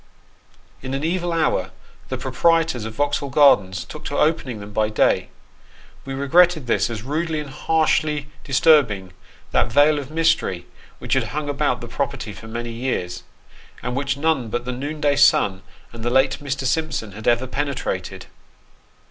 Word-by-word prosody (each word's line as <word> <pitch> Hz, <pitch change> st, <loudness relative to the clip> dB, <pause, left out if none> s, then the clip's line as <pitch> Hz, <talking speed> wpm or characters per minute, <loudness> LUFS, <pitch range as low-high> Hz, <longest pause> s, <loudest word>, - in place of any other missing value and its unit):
In 130 Hz, 0 st, -4 dB
an 135 Hz, -, -3 dB
evil 175 Hz, +1 st, -1 dB
hour, 155 Hz, -, +1 dB, 0.4 s
the -, -, -2 dB
proprietors 165 Hz, -9 st, +1 dB
of 110 Hz, 0 st, -7 dB
Vauxhall 145 Hz, +1 st, -1 dB
Gardens 105 Hz, -, +4 dB
took -, -, -10 dB
to -, -, -3 dB
opening 135 Hz, -7 st, 0 dB
them 100 Hz, 0 st, -10 dB
by 110 Hz, 0 st, +1 dB
day. 110 Hz, -, +2 dB, 0.8 s
We 135 Hz, 0 st, -5 dB
regretted 160 Hz, +2 st, +3 dB
this, 120 Hz, -, +1 dB
as 110 Hz, -3 st, -5 dB
rudely 155 Hz, +4 st, -2 dB
and 145 Hz, -2 st, -7 dB
harshly 155 Hz, -1 st, +1 dB, 0.2 s
disturbing 125 Hz, -, +3 dB, 0.4 s
that -, -, +1 dB
veil 145 Hz, +1 st, +4 dB
of 140 Hz, -1 st, -7 dB
mystery 160 Hz, -, +1 dB, 0.3 s
which -, -, -3 dB
had -, -, +2 dB
hung 150 Hz, -1 st, -4 dB
about 140 Hz, -, 0 dB
the -, -, -7 dB
property -, -, -3 dB
for 110 Hz, -, -11 dB
many 120 Hz, +1 st, -5 dB
years, 115 Hz, -8 st, -3 dB, 0.6 s
and 125 Hz, 0 st, -3 dB
which 140 Hz, 0 st, -1 dB
none 140 Hz, -6 st, 0 dB
but 120 Hz, +2 st, -3 dB
the 125 Hz, -, -3 dB
noonday 145 Hz, +2 st, -1 dB
sun, 95 Hz, -9 st, +4 dB, 0.3 s
and 115 Hz, -1 st, -8 dB
the 120 Hz, -, 0 dB
late 130 Hz, +2 st, +2 dB
Mr. 140 Hz, -1 st, -3 dB
Simpson, 145 Hz, -6 st, -1 dB
had 110 Hz, +3 st, -8 dB
ever 120 Hz, +1 st, +3 dB
penetrated. 140 Hz, +1 st, -3 dB
140 Hz, 160 wpm, -22 LUFS, 115-150 Hz, 0.8 s, Gardens